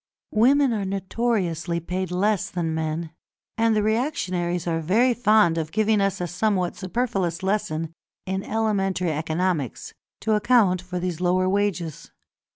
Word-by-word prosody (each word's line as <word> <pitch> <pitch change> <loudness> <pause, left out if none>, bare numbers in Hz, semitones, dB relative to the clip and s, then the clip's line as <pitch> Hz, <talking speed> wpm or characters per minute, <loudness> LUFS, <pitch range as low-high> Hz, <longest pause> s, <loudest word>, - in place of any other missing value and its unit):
Women 265 +4 +4
are 210 -2 -1
notoriously 190 -3 -1
paid 180 +2 -3
less 195 +2 0
than 165 -3 -2
men, 160 +1 -3 0.4
and 225 -1 +2
the 210 - +2
reactionaries 185 - -1
are 165 -2 0
very 225 +10 +3
fond 215 -8 +3
of 155 -1 -4
giving 215 +1 +2
us 195 -1 0
a 180 - -1
somewhat 180 0 0
superfluous 190 -4 -2
lesson 165 -5 -1 0.3
in 190 +1 -2
elementary 195 -5 0
economics, 155 - -2 0.3
to 220 - +1
account 210 -5 +3
for 180 0 -6
these 180 -1 -3
lower 185 +1 +2
wages. 185 -5 -1
185 Hz, 140 wpm, -24 LUFS, 170-215 Hz, 0.4 s, Women